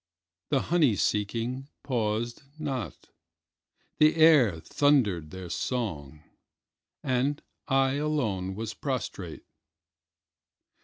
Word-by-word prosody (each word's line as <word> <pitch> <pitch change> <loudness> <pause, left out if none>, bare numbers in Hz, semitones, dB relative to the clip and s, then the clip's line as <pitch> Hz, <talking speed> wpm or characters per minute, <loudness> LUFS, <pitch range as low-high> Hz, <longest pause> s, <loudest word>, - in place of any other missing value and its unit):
The 140 -2 +2
honey 150 -11 +4
seeking 115 +7 -1
paused 120 -2 -1 0.2
not, 135 -7 -5 0.9
the 155 +1 +5
air 150 - +6
thundered 105 - +2
their 95 +2 -8
song, 80 - -3 0.8
and 135 +3 0 0.3
I 135 0 +2
alone 110 -12 -1
was 110 +1 -4
prostrate. 105 - -4
120 Hz, 85 wpm, -28 LUFS, 100-140 Hz, 0.9 s, air